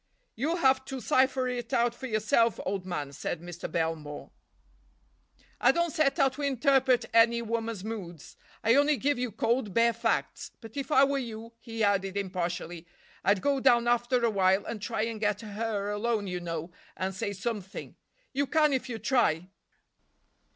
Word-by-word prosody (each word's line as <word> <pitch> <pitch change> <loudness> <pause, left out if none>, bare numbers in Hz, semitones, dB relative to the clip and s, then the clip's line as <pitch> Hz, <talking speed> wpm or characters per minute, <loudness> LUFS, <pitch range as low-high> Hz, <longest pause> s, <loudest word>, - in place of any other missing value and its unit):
"You'll 300 +9 0
have 265 -6 +3
to 265 0 -5
cipher 260 +3 +2
it 245 -2 -4
out 235 0 +2
for 260 +2 -7
yourself, 220 +1 +2
old 190 -1 -3
man," 145 -6 -4
said 160 - -4
Mr. 175 0 -7
Belmore. 160 -3 -3 1.3
"I - - +5
don't 340 -1 0
set 310 -3 +2
out 270 -3 +3
to 290 - -7
interpret 265 -2 +3
any 235 +1 +5
woman's 225 -3 -3
moods. 185 -8 -7 0.3
I 225 - +4
only 290 +2 +4
give 285 -1 0
you 250 -2 -2
cold, 230 -1 -1
bare 235 0 +4
facts. 230 - -1
But 225 -1 -12
if 280 +2 -4
I 270 -2 +6
were 280 0 +2
you," 230 -2 -7
he 225 -1 -4
added 195 -1 +1
impartially, 175 -3 -3 0.4
"I'd 200 +1 +2
go 280 -1 +2
down 240 -3 +4
after 240 0 +2
a 230 - +2
while 190 -1 +2
and 225 -3 -5
try 225 +1 -2
and 225 -1 -3
get 210 0 0
her 210 -1 -3
alone, 210 0 -1
you 180 -2 -3
know, 165 -1 -5 0.3
and 190 +1 -2
say 190 +2 -3
something. 200 -1 -5 0.4
You 280 +1 0
can, 300 0 +3
if 260 -1 -1
you 230 - -3
try." 190 -9 +1
230 Hz, 170 wpm, -29 LUFS, 195-255 Hz, 1.3 s, I